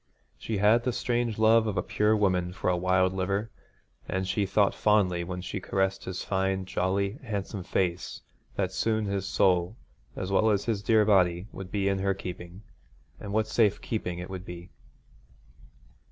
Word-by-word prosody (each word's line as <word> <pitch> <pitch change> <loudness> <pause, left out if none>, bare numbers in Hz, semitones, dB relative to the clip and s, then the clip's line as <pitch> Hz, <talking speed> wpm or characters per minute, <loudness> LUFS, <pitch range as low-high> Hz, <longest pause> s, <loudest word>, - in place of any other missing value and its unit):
She 110 - -3
had 105 +4 +4
the 125 0 0
strange 120 -2 -1
love 110 +1 +4
of 105 -3 -2
a 90 - +1
pure 105 +1 +2
woman 90 -3 +1
for 90 - 0
a - - +1
wild 95 +1 +2
liver; 100 +3 -2 0.6
and 95 +1 -1
she 100 +1 0
thought 100 +1 +3
fondly 95 -5 +2
when 90 +1 -5
she - - -4
caressed 95 0 -1
his 95 0 -4
fine, 95 0 -1
jolly, 100 +5 -1
handsome 105 -4 -4
face 90 -1 -2 0.3
that 95 -2 -1
soon 110 +2 0
his 100 -1 -2
soul 90 +2 +2 0.4
as 95 +1 -4
well 110 +3 +3
as 100 -2 +1
his 110 -4 -1
dear 110 0 +4
body 90 -3 +3
would 95 -1 -8
be 100 -2 0
in 100 -1 +1
her 95 0 0
keeping: 90 0 -8 0.6
and 100 - -7
what 110 +1 +1
safe 110 -2 +2
keeping 90 -6 -3
it 90 +1 -6
would 95 -1 -6
be. 90 0 -9
95 Hz, 175 wpm, -28 LUFS, 90-105 Hz, 0.6 s, had